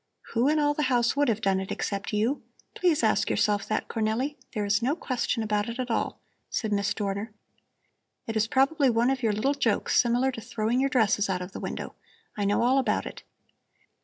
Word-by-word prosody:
"Who 240 Hz, +3 st, +2 dB
in 310 Hz, -, +2 dB
all 295 Hz, -1 st, +2 dB
the 300 Hz, -, -2 dB
house 240 Hz, -1 st, +2 dB
would 290 Hz, 0 st, +2 dB
have 225 Hz, -1 st, 0 dB
done 195 Hz, -1 st, +2 dB
it 190 Hz, -, -5 dB
except 200 Hz, -1 st, -3 dB
you? 225 Hz, +7 st, 0 dB, 0.3 s
Please 340 Hz, -8 st, +1 dB
ask 215 Hz, -1 st, +2 dB
yourself 205 Hz, -1 st, +1 dB
that, 215 Hz, -, -1 dB
Cornelli! 230 Hz, +6 st, -1 dB, 0.2 s
There 210 Hz, -1 st, 0 dB
is 215 Hz, +3 st, +2 dB
no 265 Hz, +6 st, +1 dB
question 250 Hz, -6 st, -2 dB
about 210 Hz, +1 st, 0 dB
it 235 Hz, -, -5 dB
at 255 Hz, -2 st, -3 dB
all," -, -, -1 dB, 0.3 s
said 220 Hz, -3 st, -2 dB
Miss 200 Hz, 0 st, +1 dB
Dorner. 200 Hz, +1 st, -3 dB, 0.9 s
"It 225 Hz, -, -4 dB
is 220 Hz, 0 st, +2 dB
probably 275 Hz, +3 st, +3 dB
one 235 Hz, +2 st, +2 dB
of 265 Hz, -2 st, -2 dB
your 225 Hz, -3 st, +2 dB
little 215 Hz, +7 st, +1 dB
jokes 250 Hz, -7 st, +2 dB
similar 245 Hz, +2 st, +1 dB
to 230 Hz, -, -7 dB
throwing 230 Hz, +1 st, -1 dB
your 275 Hz, +1 st, +2 dB
dresses 220 Hz, -5 st, +2 dB
out 180 Hz, -1 st, -1 dB
of 180 Hz, -, -9 dB
the -, -, -7 dB
window. -, -, -5 dB, 0.4 s
I 205 Hz, -, -1 dB
know 205 Hz, +3 st, +2 dB
all 260 Hz, +3 st, +4 dB
about 260 Hz, -, 0 dB
it. -, -, -8 dB
230 Hz, 210 wpm, -27 LUFS, 210-260 Hz, 0.9 s, all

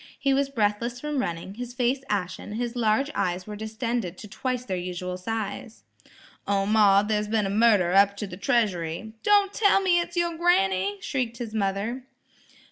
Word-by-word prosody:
He 275 Hz, 0 st, +1 dB
was 275 Hz, 0 st, +1 dB
breathless 235 Hz, 0 st, -1 dB
from 300 Hz, 0 st, -2 dB
running, 170 Hz, -4 st, -3 dB
his 245 Hz, +2 st, -7 dB
face 255 Hz, +2 st, +1 dB
ashen, 200 Hz, 0 st, -3 dB
his 240 Hz, +2 st, -3 dB
large 240 Hz, +5 st, +1 dB
eyes 180 Hz, 0 st, -1 dB
were 210 Hz, -, -7 dB
distended 220 Hz, -3 st, -3 dB
to 210 Hz, -, -9 dB
twice 250 Hz, +4 st, -3 dB
their 190 Hz, -, -2 dB
usual 180 Hz, 0 st, -4 dB
size. 220 Hz, +3 st, -5 dB, 0.6 s
"O, 200 Hz, -1 st, +1 dB
ma, 205 Hz, -1 st, +5 dB
there's 210 Hz, 0 st, -1 dB
been 215 Hz, -1 st, +1 dB
a 195 Hz, -, -2 dB
murder 205 Hz, -5 st, +4 dB
up 200 Hz, +1 st, +5 dB
to 210 Hz, -, -3 dB
the 190 Hz, -, -8 dB
treasury–" 195 Hz, -2 st, -1 dB
"Don' 410 Hz, -1 st, +4 dB
tell 405 Hz, -2 st, +4 dB
me 370 Hz, -3 st, +3 dB
it's 345 Hz, +1 st, -4 dB
yer 345 Hz, -1 st, +1 dB
granny!" 200 Hz, -, +2 dB
shrieked 250 Hz, -4 st, -2 dB
his 230 Hz, -2 st, -6 dB
mother. 210 Hz, +4 st, -2 dB
220 Hz, 175 wpm, -26 LUFS, 195-250 Hz, 0.6 s, ma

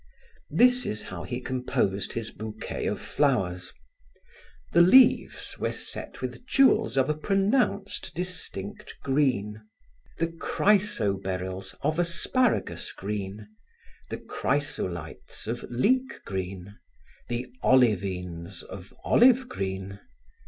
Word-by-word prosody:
This 250 Hz, +9 st, +5 dB
is 105 Hz, -, -3 dB
how 95 Hz, -2 st, -7 dB
he 120 Hz, +6 st, -4 dB
composed 125 Hz, -7 st, -1 dB
his 115 Hz, -1 st, -4 dB
bouquet 110 Hz, 0 st, -5 dB
of -, -, -1 dB
flowers: 95 Hz, -11 st, 0 dB, 1.0 s
the 170 Hz, -, +7 dB
leaves 250 Hz, +9 st, +5 dB
were -, -, 0 dB
set -, -, -7 dB
with -, -, -5 dB
jewels 230 Hz, -, +4 dB
of 130 Hz, -, +4 dB
a 150 Hz, -, +2 dB
pronounced, 195 Hz, -, 0 dB
distinct 165 Hz, -, -5 dB
green; 125 Hz, -7 st, +1 dB, 0.6 s
the 165 Hz, -, +1 dB
chrysoberyls 100 Hz, -, 0 dB
of 155 Hz, +2 st, +1 dB
asparagus 205 Hz, +8 st, +1 dB
green; 100 Hz, +1 st, -5 dB, 0.6 s
the -, -, -3 dB
chrysolites 90 Hz, -, -3 dB
of 115 Hz, +3 st, -3 dB
leek 255 Hz, -, +1 dB
green; 95 Hz, +1 st, -5 dB, 0.5 s
the 120 Hz, +1 st, -2 dB, 0.2 s
olivines 95 Hz, -7 st, +1 dB
of 95 Hz, 0 st, -10 dB
olive 255 Hz, +1 st, +5 dB
green. 95 Hz, -, -4 dB
120 Hz, 105 wpm, -27 LUFS, -, 1.0 s, the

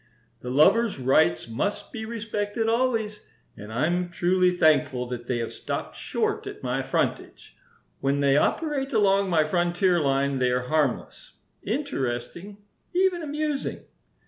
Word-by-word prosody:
"The 125 Hz, -, -7 dB
lovers' 200 Hz, -, +4 dB
rights 125 Hz, -8 st, +2 dB
must 200 Hz, -, -3 dB
be 220 Hz, -2 st, -6 dB
respected 220 Hz, -1 st, -3 dB
always, 225 Hz, -3 st, 0 dB, 0.3 s
and 105 Hz, +1 st, -10 dB
I'm 175 Hz, +9 st, 0 dB
truly 180 Hz, +1 st, +2 dB
thankful 150 Hz, -7 st, +2 dB
that 120 Hz, -1 st, -6 dB
they 125 Hz, -, 0 dB
have 115 Hz, -1 st, -4 dB
stopped -, -, -5 dB
short -, -, -2 dB
at -, -, -8 dB
my -, -, -1 dB
frontage. -, -, -3 dB, 0.4 s
When 140 Hz, +1 st, 0 dB
they 140 Hz, -1 st, +3 dB
operate 280 Hz, -, 0 dB
along 200 Hz, -2 st, +3 dB
my 160 Hz, -3 st, +3 dB
frontier 175 Hz, +2 st, +1 dB
line 140 Hz, -2 st, +1 dB
they 125 Hz, -1 st, +2 dB
are 125 Hz, 0 st, 0 dB
harmless, 150 Hz, -5 st, -1 dB, 0.3 s
interesting, 135 Hz, +11 st, -3 dB, 0.4 s
even 365 Hz, -1 st, +2 dB
amusing. 300 Hz, -1 st, -3 dB
175 Hz, 135 wpm, -25 LUFS, 135-220 Hz, 0.4 s, lovers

